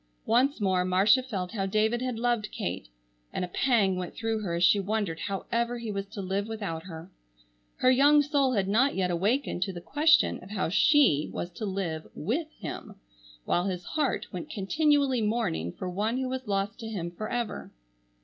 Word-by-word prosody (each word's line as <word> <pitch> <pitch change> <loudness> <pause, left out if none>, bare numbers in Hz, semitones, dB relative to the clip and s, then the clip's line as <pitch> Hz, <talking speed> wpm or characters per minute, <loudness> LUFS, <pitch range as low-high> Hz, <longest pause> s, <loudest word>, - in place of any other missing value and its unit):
Once 260 +5 +2
more 190 -3 +2
Marcia 195 +7 +4
felt 195 -8 -4
how 195 -3 -2
David 220 +4 +1
had 255 -2 -2
loved 235 -2 0
Kate 90 -6 -4 0.4
and 180 - -2
a - - -9
pang 200 -1 +2
went 180 -1 -5
through 225 -1 -1
her 185 -5 -3
as 170 - 0
she 200 +3 +5
wondered 200 -4 -2
however 235 +6 -2
he 230 -2 -5
was 200 0 -4
to 200 -1 -7
live 195 +2 -2
without 200 -7 -5
her. 170 0 -9 0.6
Her 255 - +4
young 290 +3 +5
soul 280 -3 +1
had 195 -4 +1
not 240 +8 +3
yet 185 -2 0
awakened 200 +4 0
to 190 - 0
the 175 - -7
question 300 - +3
of 185 - -12
how 200 -5 -1
she 200 - +4
was 175 - -5
to 210 +4 -5
live 180 -5 -3
with 265 - -2
him, - - -7 0.5
while 175 - +1
his 180 -2 -3
heart 300 - -1
went 180 -2 -6
continually 280 +4 +2
mourning 210 - -1
for 185 - -6
one 210 +7 -1
who 260 -1 -2
was 260 -2 -4
lost 200 +1 -1
to 225 - -6
him 175 -6 -4
forever. 215 +5 -4
210 Hz, 190 wpm, -28 LUFS, 185-245 Hz, 0.6 s, she